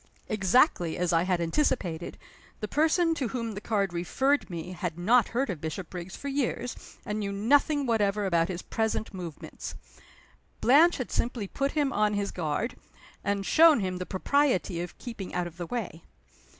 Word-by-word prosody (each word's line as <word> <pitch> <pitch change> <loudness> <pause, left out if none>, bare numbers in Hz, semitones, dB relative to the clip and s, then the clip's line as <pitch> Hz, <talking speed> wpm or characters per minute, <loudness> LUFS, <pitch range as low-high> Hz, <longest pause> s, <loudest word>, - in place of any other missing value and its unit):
Exactly 195 - +3
as 175 0 0
I 165 - +4
had 180 0 +1
anticipated, 170 - -1 0.4
the 210 - -3
person 325 - +2
to 275 -6 -2
whom 230 -1 -3
the 205 -1 -6
card 200 -4 0
referred 265 - +1
me 170 0 -5
had 175 -3 -4
not 225 +7 +4
heard 250 0 -1
of 165 -5 -7
Bishopriggs 175 +2 -6
for 280 - -7
years, 265 -3 -3
and 210 +1 -2
knew 200 -1 -2
nothing 280 +8 +2
whatever 210 -3 +1
about 170 -3 +2
his 180 -2 -5
present 220 -1 -2
movements. 175 -5 -7 0.8
Blanche 315 +7 +5
had 255 - -4
simply 235 -4 -1
put 275 +7 -2
him 285 -3 +1
on 210 0 +2
his 200 0 -1
guard, 170 +7 -2 0.5
and 200 -1 -1
shown 320 +1 +6
him 185 -2 -2
the 180 - -5
propriety 195 -5 +1
of 175 - -7
keeping 225 -8 -7
out 180 -1 0
of 170 -1 -9
the 175 -1 -5
way. 210 -8 -4
205 Hz, 170 wpm, -28 LUFS, 180-250 Hz, 0.8 s, shown